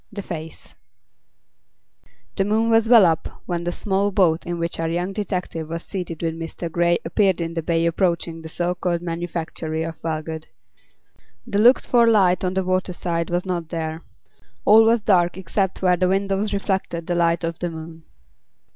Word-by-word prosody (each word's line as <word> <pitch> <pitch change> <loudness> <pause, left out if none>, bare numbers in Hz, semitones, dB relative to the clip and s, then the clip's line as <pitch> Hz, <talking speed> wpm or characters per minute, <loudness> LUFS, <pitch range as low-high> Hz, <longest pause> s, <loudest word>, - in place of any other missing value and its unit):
THE 200 -1 -6
FACE 160 -3 -8 1.6
The 195 - +1
moon 220 +3 +1
was 225 0 +3
well 230 -5 +8
up 165 -2 -1
when 175 -1 -3
the 175 - 0
small 195 +2 0
boat 175 -5 +2
in 175 0 -2
which 170 0 -3
our 165 0 -1
young 175 +3 -2
detective 180 -6 -3
was 165 +1 -4
seated 175 -4 -6
with 165 -1 0
Mr. 165 +1 -5
Grey 170 +1 +2
appeared 190 +2 +2
in 165 0 -3
the 165 - -2
bay 165 +1 0
approaching 170 -1 0
the 160 - -9
so 175 +2 -1
called 175 -1 -2
manufactory 165 -2 -4
of 165 -1 -7
Wellgood. 160 0 -4 1.0
The 210 -4 -1
looked 245 +4 +5
for 235 -2 +4
light 190 -5 +4
on 185 0 -1
the 190 - +1
waterside 180 -2 -1
was 175 +1 -1
not 175 -3 -3
there. 160 -1 -4 0.6
All 220 +2 +8
was 225 -1 +3
dark 180 -4 +3
except 190 +1 -2
where 180 -1 +4
the 185 +1 +2
windows 195 +2 0
reflected 190 -4 -2
the 175 - -1
light 170 0 +1
of 165 0 -3
the 175 - -2
moon. 160 0 -9
175 Hz, 175 wpm, -22 LUFS, 165-195 Hz, 1.6 s, well